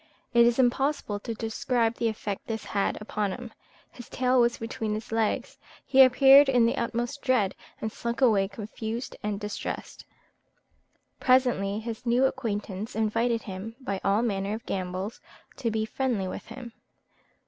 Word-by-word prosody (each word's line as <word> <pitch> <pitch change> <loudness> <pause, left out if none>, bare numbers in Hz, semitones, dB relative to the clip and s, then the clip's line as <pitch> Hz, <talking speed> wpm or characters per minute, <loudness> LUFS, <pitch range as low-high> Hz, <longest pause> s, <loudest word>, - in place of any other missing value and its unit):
It 235 0 +6
is 235 - +2
impossible 260 -3 +1
to 230 +2 -5
describe 225 +1 0
the 235 - +1
effect 210 -2 -4
this 225 -1 -4
had 200 -1 -1
upon 210 -1 -2
him; 245 0 -8 0.4
his 245 - -12
tail 255 0 +2
was 235 0 +2
between 225 -1 -3
his 215 +1 -7
legs, 225 -1 -1 0.3
he 270 - +6
appeared 270 +2 +8
in 245 -3 +4
the 230 - +1
utmost 240 +4 -2
dread, 230 -8 +2 0.3
and 220 - -3
slunk 235 +1 -4
away 215 -7 +4
confused 220 +3 -6
and 205 -1 -2
distressed: 210 0 -5 1.2
presently 245 -6 +3
his 225 0 -6
new 245 +2 +3
acquaintance 215 -5 -3
invited 230 +2 +1
him, 200 +3 -7
by 200 -7 -4
all 200 +3 +2
manner 200 -2 -1
of 225 - -9
gambols, 185 +3 -4 0.4
to 235 - -1
be 220 0 -1
friendly 230 -5 -1
with - - -7
him. 235 0 -9
225 Hz, 155 wpm, -27 LUFS, 210-245 Hz, 1.2 s, appeared